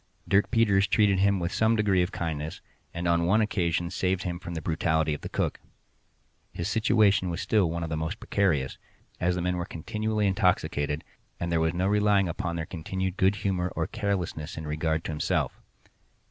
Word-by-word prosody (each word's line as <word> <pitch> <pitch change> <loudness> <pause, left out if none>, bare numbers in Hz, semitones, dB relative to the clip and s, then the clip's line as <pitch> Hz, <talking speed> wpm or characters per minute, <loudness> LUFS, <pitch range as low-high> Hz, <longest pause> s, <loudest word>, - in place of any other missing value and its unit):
Dirk 100 +1 +3
Peters 105 -4 +3
treated 100 -3 +3
him 100 0 +3
with 85 0 -2
some 110 +1 +3
degree 100 -4 +3
of 90 +2 -1
kindness, 80 -2 -4 0.3
and 85 +1 -3
on 85 0 +2
one 105 +5 +4
occasion 85 -5 0
saved 95 0 0
him 85 -1 -3
from 85 -1 -7
the - - -2
brutality 80 -1 +1
of 75 - -5
the - - -6
cook. - - -1 0.9
His 85 - -4
situation 105 -4 +3
was 85 +1 -3
still 105 -6 +2
one 85 +1 -3
of 80 - -4
the 80 - -1
most 80 +7 -3
precarious, 80 -10 0 0.4
as 90 0 +1
the 90 - -2
men 90 0 0
were 85 - -2
continually 105 +5 -2
intoxicated, 80 -7 +1 0.4
and 85 0 -2
there 85 - +2
was 80 +1 +1
no 90 +2 0
relying 105 -1 +3
upon 85 0 -3
their 80 -1 -3
continued 95 +3 -3
good 95 +2 +3
humor 90 -2 0
or - - 0
carelessness 90 -6 -3
in 80 - -5
regard 80 +1 -1
to - - -4
himself. 75 - -1
90 Hz, 190 wpm, -27 LUFS, 85-100 Hz, 0.9 s, one